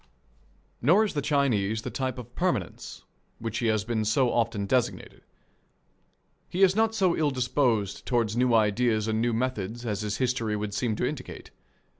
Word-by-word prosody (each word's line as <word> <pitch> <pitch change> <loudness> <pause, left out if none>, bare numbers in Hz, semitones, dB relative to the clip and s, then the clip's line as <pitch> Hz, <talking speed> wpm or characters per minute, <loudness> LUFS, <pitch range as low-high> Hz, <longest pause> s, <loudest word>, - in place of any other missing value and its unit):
Nor 175 - +5
is 210 - -4
the 145 - -1
Chinese 115 -8 +1
the 125 - -5
type 130 +1 -3
of 120 -1 -9
permanence 175 - -3 0.3
which 115 0 -4
he 120 - 0
has 110 -2 +1
been 115 -2 -1
so 120 +4 +2
often 115 -3 0
designated. 125 +4 -1 1.3
He 185 +2 +1
is 190 0 +5
not 225 0 +2
so 185 -5 +2
ill 155 -2 +1
disposed 125 -6 0
toward 115 -3 +1
new 125 -1 +3
ideas 110 0 +2
and 110 0 0
new 120 +1 +1
methods 120 -1 -3
as 105 -3 -2
his 105 -1 -2
history 120 -4 0
would 105 -1 -4
seem 110 0 -1
to - - -1
indicate. - - -6
120 Hz, 170 wpm, -27 LUFS, 110-130 Hz, 1.3 s, Nor